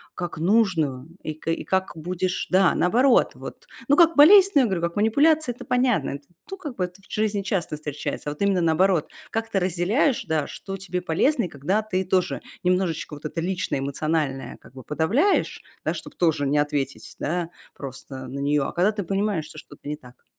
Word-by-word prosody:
как 175 -2 -5
нужную 165 - +1 0.2
и 155 - -3
кэ 165 +2 -3
и - - -5
как 190 0 -1
будешь, 180 +3 -2
да, 185 -2 +4
наоборот, 240 +8 +3
вот - - -10 0.2
ну, 285 - +5
как 335 -2 +5
болезнь, 390 +6 +8
я 255 - +4
говорю, 190 -5 -1
как 170 0 -2
манипуляция 285 +5 +3
это - - -10
понятно. 245 - +1
Это 140 0 -8 0.2
ту 390 - -7
как 295 -9 -7
бы 185 - -1
это 180 +2 -6
в - - -21
жизни 210 -2 0
часто 190 -6 -2
встречается. 150 0 -5
А, - - -3
вот 150 - -16
именно 200 -2 +2
наоборот, 165 +1 +2 0.2
как 225 0 -3
ты 195 - +1
разделяешь, 190 - +1
да, 155 -2 0
что 195 - -7
тебе 180 -1 -4
полезно, 235 - +1
и - - -2
когда 160 +9 -1
ты 190 -3 -2
тоже 185 -1 0 0.2
немножечко 180 -4 0
вот 145 - -13
это 155 - -4
личное 180 -4 -1
эмоциональное 140 0 -2
как - - -18
бы 130 -2 -10
подавляешь, 210 - +1 0.2
да, - - +1
чтоб - - -8
тоже 160 -5 +1
не 145 +2 +1
ответить, 145 -2 -2
да, 170 +2 -2 0.2
просто 135 -1 -8
на 135 +2 -6
неё. 140 0 +1
А - - -5
когда 185 +5 +3
ты 210 -1 -4
понимаешь, 195 -2 -1
что - - -12
что-то 145 - -12
не 150 - -2
так. 125 -3 -18
180 Hz, 200 wpm, -24 LUFS, 150-210 Hz, 0.2 s, болезнь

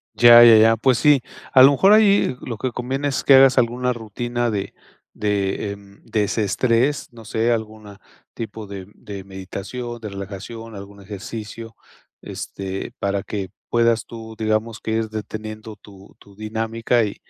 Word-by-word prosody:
Ya, 120 0 +9
ya, 115 -1 +8
ya. 115 +1 +5
Pues 125 +1 +2
sí, 145 -4 +4 0.3
a 130 - +9
lo 135 - +9
mejor 190 +9 +4
ahí 200 -11 +4
lo 115 -4 -6
que 130 - -2
conviene 130 +4 -3
es 135 - -2
que - - +5
hagas 135 -1 +7
alguna 125 0 +1
rutina 120 +2 -3
de 100 -3 -4 0.4
de, 100 -1 -2
em, 100 0 -14
desestrés. 115 +6 0
No 115 -1 -13
sé, 115 +2 0
alguna 110 -3 -4 0.4
tipo 110 -1 -7
de 100 -2 -8
de 100 -2 -9
meditación, 100 +5 -7
de 105 -2 -7
relajación, 105 +3 -8
algún 100 0 -11
ejercicio, 110 +3 -8 0.4
este, 95 0 -6
para 100 0 -1
que 100 -2 -5 0.2
puedas 115 -1 +2
tú, 110 -1 -10
digamos, 110 +1 -1
que - - -5
ir 110 0 -1
deteniendo 110 0 -7
tu 100 -1 -17
tu 100 -1 -19
dinámica 115 +2 -1
y 105 - -5
110 Hz, 155 wpm, -21 LUFS, 100-120 Hz, 0.4 s, Ya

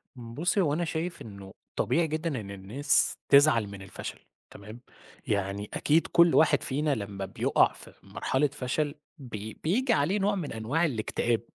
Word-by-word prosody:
بُصّي، 140 - -1
هو 150 -5 +1
أنا 170 +3 0
شايف 170 +2 -4
إنه 100 -3 -10 0.2
طبيعي 165 0 +1
جدًا 155 -3 -2
إن 100 -1 -9
الناس 105 +10 +1
تِزعَل 140 -6 +5
من 100 -1 -9
الفَشَل، 95 - -8 0.3
تمام؟ 105 +4 -11 0.5
يعني 100 0 -2
أكيد 160 +3 +2
كُلّ 170 0 +5
واحد 160 - +4
فينا 145 +1 0
لمّا 100 -3 -5
بيُقَع 95 - +2
في - - -13
مرحلة 135 +3 0
فَشَل 145 +2 -2 0.2
بي 110 -6 -7
بييجي 235 - +2
عليه 160 +8 +1
نوع 200 +1 +1
من 170 - -4
أنواع 120 +10 0
الاكتئاب، 115 -3 -1
140 Hz, 155 wpm, -28 LUFS, 105-160 Hz, 0.5 s, تِزعَل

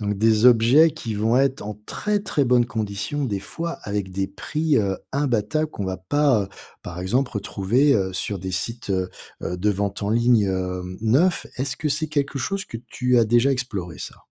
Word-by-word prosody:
donc 105 -1 -1
des 110 +3 +4
objets 125 +7 +6
qui 115 -6 -5
vont 110 +4 +2
être 135 -2 +2
en 105 0 -6
très, 210 0 -1
très 150 -8 0
bonnes 120 -1 +3
conditions 110 +6 -3
des 100 -6 -2
fois 165 +9 -4
avec 100 -2 -3
des 95 +1 -1
prix, 155 +7 -1
heu, 100 -4 +1 0.2
imbattables 140 +2 0
qu'on 100 - -5
va 95 0 -2
pas, 130 +3 +2
heu, 95 - -6 0.3
par 90 0 -7
exemple 120 +8 0
retrouver, 110 +6 +2
heu, 95 -3 0
sur 100 +2 -3
des 95 +1 -5
sites, 115 +3 -4
heu, 95 -1 0 0.3
de 90 +4 -1
vente 100 0 -2
en 100 - -1
ligne, 115 -1 +4
hem, 90 -1 -3
neufs. 135 - +2
Est-ce 130 +2 -2
que 150 - -2
c'est 155 +2 -1
quelque 140 -2 -1
chose 195 +8 -2
que - - -7
tu 125 +1 0
as 115 - +5
déjà 120 +5 +3
exploré 100 -10 -4
ça? - - -7
115 Hz, 195 wpm, -23 LUFS, 100-140 Hz, 0.3 s, objets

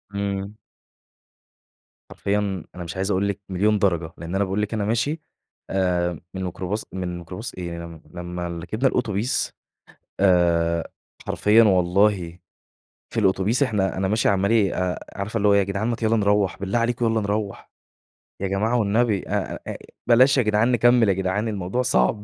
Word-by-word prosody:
إمم. 100 0 -3 1.5
حرفيًا 100 -3 -2
أنا 90 - -6
مش 85 0 -7
عايز 95 +2 -1
أقول 100 +1 +1
لكِ 100 0 -3
مليون 105 +3 +2
درجة، 85 -5 0
لإن 85 +3 -5
أنا 100 - +2
باقول 95 +2 -1
لكِ 105 +1 -2
أنا 105 -2 -1
ماشي 120 +9 0 0.5
آآ 90 -3 0
من 95 - -4
ميكروباص 95 +3 -3
من 90 -2 -4
ميكروباص 90 +6 -7
إيه 85 -2 -6
م 85 -2 -11
لمّا 90 0 -5
ركبنا 85 +9 -1
الأوتوبيس 120 -2 -1 0.7
آآ 85 -3 +3 0.4
حرفيًا 110 +2 +4
والله 90 -2 +2 0.8
في 115 - 0
الأوتوبيس 100 +5 +2
إحنا 105 -8 0
أنا 95 0 0
ماشي 110 +3 +2
عمّال 100 0 +2
أ 90 -1 -1 0.2
عارفة 105 +3 -3
اللي 105 -1 +2
هو 100 - +5
يا 100 0 +4
جدعان 100 +3 -2
ما 120 - 0
ت 115 - -8
يالّا 110 +1 +3
نروّح، 100 -2 +1
بالله 100 +4 0
عليكم 120 0 0
يالّا 115 -1 +2
نروّح، 105 0 -3 0.7
يا 100 - 0
جماعة 105 +5 0
والنبي 105 -1 +1
أ - - -2
أ - - -4 0.3
بلاش 130 +3 +6
يا 130 - +4
جدعان 110 +3 +2
نكمّل 120 -2 +4
يا - - +4
جدعان 95 +3 -1
الموضوع 100 +3 -2
صعب 105 - +2
100 Hz, 165 wpm, -23 LUFS, 90-110 Hz, 1.5 s, بلاش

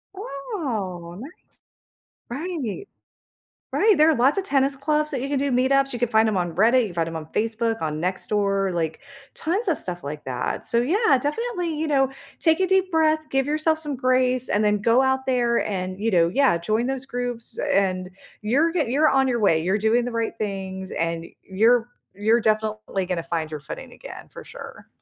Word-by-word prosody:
Oh, 245 - -5
nice. 275 +8 -8 1.0
Right. 315 - -4 0.9
Right, 420 -6 +4
there 310 - +6
are 320 - +4
lots 265 +9 +3
a 390 - +1
tennis 275 -5 +1
clubs 300 +2 0
that 265 -4 -2
you 270 - -2
can 285 - -1
do 280 - 0
meetups, 270 +2 +2
you 240 - -4
can 245 - +1
find 220 0 +3
'em 210 - 0
on 175 -3 -1
Reddit, 235 +7 +4
you - - -1
can - - -10
find 165 -1 0
'em 165 - -6
on 155 -1 -6
Facebook, 225 -1 -1
on 155 -1 -2
Nextdoor, 195 +2 0
like 160 -2 -2 0.3
tons 380 +8 -1
of 335 -5 0
stuff 175 -4 -5
like 150 +1 -6
that. 125 -1 -3
So, 235 - +1
yeah, 300 - +3
definitely, 355 - -2
you 315 +1 -2
know, 270 -2 +2 0.3
take 320 +1 +3
a 375 - +2
deep 380 -1 +2
breath, 310 -1 +2
give 270 +1 +1
yourself 310 +1 +1
some 295 -4 -4
grace, 255 0 +2
and 205 - +1
then 210 -1 +2
go 230 +4 +4
out 265 0 +1
there 240 -2 +2
and, 185 -1 -3
you 220 0 -1
know 170 -2 +4
yeah, 260 -1 +3
join 215 +8 0
those 265 0 -3
groups, 245 -2 -5
and 185 -2 +1 0.3
you're 280 +10 +2
ge 325 -6 0
you're 285 +6 +3
on 270 -1 +3
the 250 - 0
way, 200 -8 +3
you're 185 +5 0
doing 225 +3 +2
the 245 - -4
right 230 -1 -2
things, 190 -2 -4
and 165 0 -2 0.2
you're 225 +5 +2 0.3
you're 220 +4 +2
definitely 215 -3 -1
gonna 175 -3 -2
find 165 -2 -3
your 155 - -5
footing 145 - -9
again, - - -11
for - - -11
sure. - - -11
235 Hz, 200 wpm, -23 LUFS, 195-280 Hz, 1.0 s, there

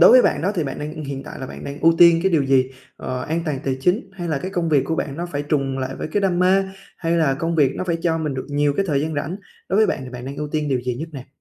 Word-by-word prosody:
đối - - +9
với 255 - +8
bạn - - +1
đó 200 +4 +1
thì 170 -5 0
bạn 135 - -4
đang 155 +1 -5
hiện 135 -1 -5
tại - - -9
là 130 - -5
bạn - - -9
đang 140 +1 -6
ưu 165 +1 +5
tiên 170 -1 +7
cái 190 0 +2
điều 155 -4 +4
gì? 130 -1 +3 0.3
Ờ, 130 0 -4
an 165 +5 -1
toàn 150 -5 -1
tài 135 -1 0
chính 185 - +1
hay 175 -3 -5
là 150 - 0
cái 185 +6 -5
công 175 -3 -1
việc 145 -4 +4
của 160 - -1
bạn 140 -2 -3
nó 170 +2 -3
phải 145 -4 -3
trùng 135 -2 -1
lại 130 0 -3
với - - -4
cái 205 - +2
đam 185 -3 +1
mê? 190 +2 +4 0.3
Hay 165 -1 -1
là 155 -5 +3
công 165 +4 -2
việc 140 -3 +4
nó - - -2
phải 170 -2 0
cho 165 -1 +1
mình 150 -4 -2
được 130 - -4
nhiều 145 0 +2
cái 195 - +2
thời 140 -3 +2
gian 155 +2 -2
rảnh? 145 +5 -2 0.3
Đối 190 - +1
với 215 +1 +5
bạn - - 0
thì 125 - -8
bạn 125 0 -7
đang 140 +1 -6
ưu 150 0 -3
tiên 150 -1 0
điều 130 -2 +1
gì 125 0 -2
nhất 155 +7 -5
nè? 135 -3 -8
150 Hz, 330 wpm, -22 LUFS, 135-170 Hz, 0.3 s, đối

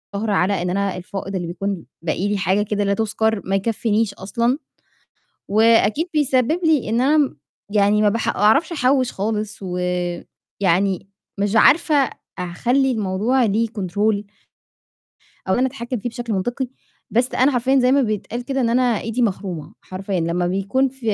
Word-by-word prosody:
على 200 -3 +1
إن 180 - -1
أنا 195 0 -1
الفائض 195 +2 -6
اللي 175 -2 -3
بيكون 190 0 -4 0.2
باقي 170 +4 -1
لي، 205 - 0
حاجة 190 +2 +1
كده 205 0 -1
لا 200 0 +1
تُذكّر، 220 0 0
ما 195 - 0
يكفّينيش 220 +1 0
أصلًا، 235 +7 -1 0.9
وأكيد 225 - +3
بيسبب 290 +1 +2
لي 310 -8 +2
إن 230 +2 +1
أنا 290 +4 +3
م 280 - +1 0.3
يعني 205 0 +3
ما 210 - +4
بح 225 +2 -2
أعرفش 275 - +3
أحوّش 260 -3 +2
خالص، 210 +1 -3
ويعني 180 +1 -2 0.3
مش 205 +2 0
عارفة 315 +5 +5 0.4
أع 180 -1 -4
خلّي 265 +7 +2
الموضوع 220 +4 +1
ليه 220 +2 +1
control 205 0 -1 1.3
أو 190 - +3
إن - - 0
أنا 255 - +3
أتحكم 250 -1 -4
فيه 230 - -4
بشكل 240 -1 -5
منطقي، 245 +7 -2 0.4
بس 245 +3 +1
أنا 265 +3 +3
حرفيًا 260 +2 +2
زي 250 +1 +3
ما 280 0 +4
بيتقال 230 +2 -3
كده 270 +1 -2
إن 240 - +2
أنا 245 -2 +2
إيدي 230 +3 -2
مخرومة 185 -7 -3
حرفيًا، 190 0 -4
لمّا 170 +2 0
بيكون 195 +9 +1
ف 265 +1 -19
215 Hz, 160 wpm, -21 LUFS, 195-250 Hz, 1.3 s, عارفة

